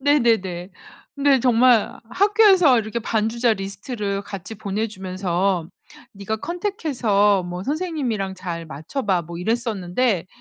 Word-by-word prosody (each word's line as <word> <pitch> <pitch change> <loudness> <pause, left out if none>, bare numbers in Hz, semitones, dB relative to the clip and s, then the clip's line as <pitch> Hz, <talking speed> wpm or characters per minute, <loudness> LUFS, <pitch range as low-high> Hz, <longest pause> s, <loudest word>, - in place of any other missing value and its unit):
네네네. 225 -11 +1 0.4
근데 280 -2 +3
정말 245 -2 +3
학교에서 385 - +5
이렇게 220 +2 -3
반주자 225 +2 +1
리스트를 200 0 -4
같이 200 +1 -8
보내주면서 190 -4 -2 0.5
"네가 200 +2 -3
컨택 355 - -4
해서 205 -8 +3
뭐 180 +1 -6
선생님이랑 275 - -2
잘 175 -3 -5
맞춰봐." 175 - -2
뭐 170 +1 -9
이랬었는데 210 -1 -1
215 Hz, 290 characters per minute, -22 LUFS, 190-255 Hz, 0.5 s, 학교에서